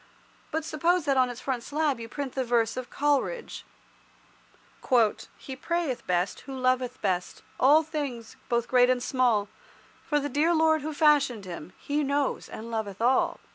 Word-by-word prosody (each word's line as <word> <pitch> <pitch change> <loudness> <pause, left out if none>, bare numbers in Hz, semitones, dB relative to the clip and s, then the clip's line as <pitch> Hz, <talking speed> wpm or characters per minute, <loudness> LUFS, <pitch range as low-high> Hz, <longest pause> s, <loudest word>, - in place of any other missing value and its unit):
But 320 0 -2
suppose 335 +2 +1
that 275 -2 +2
on 255 -1 +3
its 245 0 -7
front 255 -3 -2
slab 290 -1 -1
you 230 0 -7
print 280 -1 -5
the 265 - -1
verse 230 -2 +1
of 255 -1 -5
Coleridge— 295 - -1 1.7
"He 265 - -8
prayeth 325 -1 -2
best 180 +1 0
who 270 - -8
loveth 255 -1 0
best 180 -3 -2 0.2
All 295 +5 +6
things, 285 -8 -5
both 235 -1 +1
great 250 -1 +4
and 250 -1 +1
small 240 -6 +2 0.6
For 295 -2 +1
the 290 - -2
dear 310 +4 +2
Lord 315 -1 +3
who 310 +3 -4
fashioned 285 - +3
him 175 -1 -8
He 295 +1 -1
knows 280 0 -1
and 230 +2 -8
loveth 210 -4 -4
all." 245 +3 +2
260 Hz, 165 wpm, -27 LUFS, 235-295 Hz, 1.7 s, All